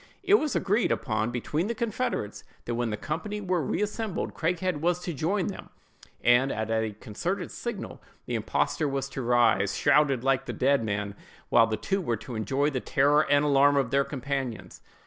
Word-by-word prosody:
It 395 +2 +5
was 305 -4 -2
agreed 205 +4 +1
upon 110 -2 0
between 150 - -2
the 235 - -2
confederates, 230 - -2 0.2
that 120 - -2
when 120 0 -1
the 105 - -3
company 200 - -4
were 185 -4 0
reassembled 210 - -2
Craighead 180 0 -1
was 175 +1 +2
to 180 -1 -4
join 175 +7 0
them, 195 - -6 0.5
and, 120 +3 +4
at 110 +1 -3
a 110 -1 0
concerted 180 - -3
signal 235 -4 -6 0.2
the - - -5
impostor 155 - 0
was 135 -1 -2
to 135 - -5
rise, 120 -5 +3
shrouded 140 -4 +3
like 135 -1 +1
the - - -3
dead 135 -1 +2
man, 105 -1 -2 0.4
while 115 - +5
the 110 -1 -2
two 195 - -1
were 120 -9 -1
to 125 - -9
enjoy 135 +7 0
the 130 - -1
terror 145 +4 +2
and 145 +1 +4
alarm 140 0 +4
of 130 -4 +1
their 140 0 +3
companions. 135 -5 -4
140 Hz, 185 wpm, -27 LUFS, 120-180 Hz, 0.5 s, It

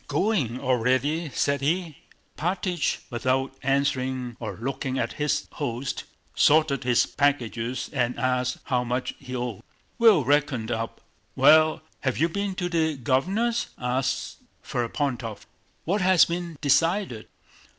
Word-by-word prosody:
"Going 155 - 0
already?" 130 +6 +1
said 140 +1 0
he. 165 +2 0 0.4
Alpátych, 180 0 -1
without 130 +3 0
answering 130 -2 0
or 110 - -5
looking 135 +1 -3
at - - -1
his 150 - 0
host, 130 -2 -4 0.3
sorted 150 -2 +3
his 125 -1 +3
packages 125 -4 -1
and 125 -2 0
asked 125 -1 0
how 125 -3 0
much 125 +1 -2
he 130 -2 -7
owed. 120 -5 -4 0.4
"We'll 220 - +6
reckon 140 -5 +1
up! 115 -1 -3 0.3
Well, 155 +4 +5 0.2
have 130 -2 -1
you 165 +2 +2
been 200 +1 -2
to 180 -1 -2
the 160 -3 0
Governor's?" 190 - 0
asked 130 +2 -2 0.3
Ferapóntov. 120 -2 -3 0.4
"What 195 +5 +1
has 185 -1 +6
been 170 -2 -4
decided?" 165 - +1
140 Hz, 125 wpm, -25 LUFS, 125-160 Hz, 0.4 s, We'll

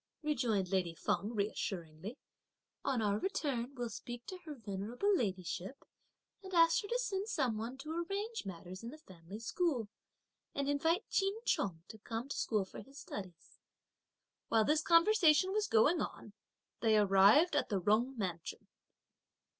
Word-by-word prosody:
rejoined 235 -11 0
lady 180 -3 0
Feng 210 +7 -1
reassuringly; 195 -2 -3 0.7
"on 255 -5 0
our 205 0 +1
return 275 - -2
we'll 245 -2 -3
speak 240 +2 -7
to 370 - -7
her 305 -2 -6
venerable 225 - -1
ladyship 190 - -3 0.6
and 380 -2 -6
ask 330 -1 +6
her 410 - -7
to 475 - 0
send 415 -5 -2
some 265 - 0
one 230 +4 -5
to 305 +3 -7
arrange 395 +7 -3
matters 185 0 -8
in 230 - -6
the 300 - -10
family 185 - -11
school, 240 - -1 0.7
and 280 0 -1
invite 320 +7 +1
Ch'in 390 +2 +1
Chung 170 -5 0
to 220 - -11
come 225 +4 -5
to 285 - -4
school 210 -4 0
for - - -9
his 275 +1 -15
studies." 185 - -9 0.9
While 225 - +4
yet 215 - +1
this 305 +1 +4
conversation 340 0 +5
was 420 0 +1
going 290 +10 +4
on, 210 - -6 0.5
they 220 -2 +4
arrived 205 - +6
at 290 - +1
the 200 -3 +1
Jung 225 +8 +2
Mansion. 180 -6 -4
240 Hz, 155 wpm, -35 LUFS, 200-320 Hz, 0.9 s, ask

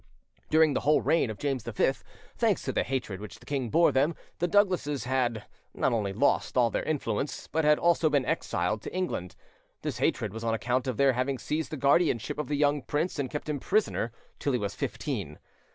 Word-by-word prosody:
During 155 -1 +5
the - - +1
whole 150 +3 +3
reign 165 -7 +2
of 110 - -5
James 135 -1 -1
V, - - +1 0.4
thanks - - +1
to - - -2
the - - +1
hatred 120 -7 -3
which 105 +1 -8
the 120 - -18
king 135 -3 -2
bore 165 +3 +4
them, 140 +5 +2 0.2
the 175 - +1
Douglases 180 -7 +2
had: 120 -3 0 0.3
not - - +1
only 105 -4 0
lost 130 +5 +1
all 120 -2 +4
their - - 0
influence, 145 -3 -2
but 160 +1 0
had 150 0 +5
also 170 -2 +3
been 145 -3 +2
exiled 105 - -1
to - - -7
England. 180 - -3 0.5
This - - -3
hatred 105 -2 0
was 115 +1 -6
on 115 -1 +1
account 125 +3 -1
of 125 -4 -2
their 135 -1 +4
having 130 +2 -1
seized 150 +6 -2
the 155 - -5
guardianship 140 -2 +2
of 150 - -2
the 145 - -1
young 145 0 +2
prince 150 +4 -2
and 135 -2 -1
kept 150 +2 -5
him 150 -2 -2
prisoner 195 - 0 0.3
till 140 - 0
he - - +3
was 100 -3 -3
fifteen. 110 - -4
135 Hz, 210 wpm, -28 LUFS, 115-150 Hz, 0.5 s, During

